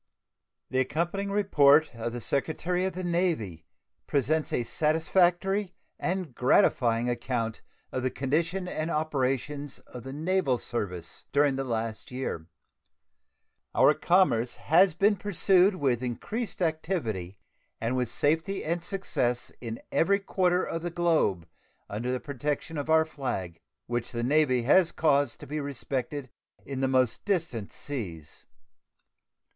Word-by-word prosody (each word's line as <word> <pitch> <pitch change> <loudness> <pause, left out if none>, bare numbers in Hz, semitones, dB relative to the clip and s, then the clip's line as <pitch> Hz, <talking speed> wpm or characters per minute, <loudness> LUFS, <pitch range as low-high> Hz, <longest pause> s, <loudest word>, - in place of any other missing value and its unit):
The 130 - +1
accompanying 170 +9 -1
report 155 -8 +4
of 115 0 -4
the 120 0 -5
Secretary 165 - 0
of 190 - -2
the 185 +2 -5
Navy 170 - -1 0.4
presents 150 +3 +1
a 120 - 0
satisfactory 175 - +1 0.2
and 180 -6 -2
gratifying 120 -1 +3
account 120 -2 -2 0.3
of 130 - -2
the 130 - +1
condition 165 +8 -1
and 155 -1 -3
operations 145 -2 -1
of 125 - -11
the 135 +3 -8
naval 155 -2 +1
service 90 -9 -5
during 140 -1 +3
the 135 0 -2
past 115 -1 -3
year. 125 -11 -4 1.3
Our - - +6
commerce 170 -10 +2
has 175 +1 +4
been 205 +1 +3
pursued 190 0 +3
with 130 -7 +1
increased 200 - -3
activity 150 - -2 0.4
and 115 +3 -1
with 125 -2 0
safety 160 +7 0
and 170 +2 -1
success 130 - -2
in 115 -1 -5
every 200 +4 +3
quarter 185 -2 +1
of 165 - -3
the 175 - -3
globe 160 - +1 0.4
under 115 +5 -2
the 130 - -1
protection 145 +3 -3
of 145 - -5
our 160 0 +5
flag, 95 - -4 0.3
which 120 -1 -3
the 120 -1 -3
Navy 130 -2 +3
has 170 +7 +5
caused 145 -5 +2
to - - -7
be 150 +2 -3
respected 140 -1 -4 0.3
in 135 -1 -5
the 135 - +2
most 130 -3 +1
distant 165 - -1
seas. 90 - -7
145 Hz, 135 wpm, -28 LUFS, 120-175 Hz, 1.3 s, Our